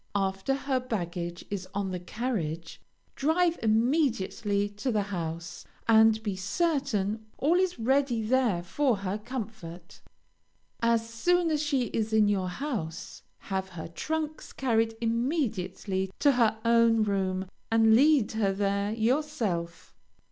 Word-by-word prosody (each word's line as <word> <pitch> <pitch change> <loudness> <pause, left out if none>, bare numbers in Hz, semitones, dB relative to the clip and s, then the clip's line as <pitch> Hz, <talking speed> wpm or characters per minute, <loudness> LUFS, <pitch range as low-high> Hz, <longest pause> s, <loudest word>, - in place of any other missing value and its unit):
After 195 +6 0
her 270 -1 -1
baggage 175 -7 -4
is 190 -2 -4
on 200 -2 -1
the 180 - -3
carriage, 175 -6 -4 0.3
drive 335 +4 +2
immediately 220 -4 +1
to 205 +6 -3
the 210 -2 +1
house, 170 -4 -5 0.2
and 220 -1 +5
be 205 -3 -2
certain 220 - -1
all 300 +5 +2
is 370 -1 0
ready 250 -1 +1
there 225 -6 +1
for 255 +8 +1
her 195 +1 -3
comfort. 210 -8 -8 0.8
As 230 -1 +2
soon 340 +9 +1
as 300 -1 +1
she 285 -4 +1
is 220 0 -2
at 215 -1 +5
your 190 -3 0
house, 190 - -5 0.2
have 190 -1 -3
her 175 -3 -7
trunks 310 - -4
carried 225 -3 +1
immediately 225 - -1
to 285 - +4
her 230 -4 +2
own 230 -1 +4
room, 190 -2 -1 0.2
and 225 -1 +5
lead 275 -1 +5
her 215 -3 +1
there 200 +1 0
yourself. 220 - -1
220 Hz, 130 wpm, -28 LUFS, 190-260 Hz, 0.8 s, and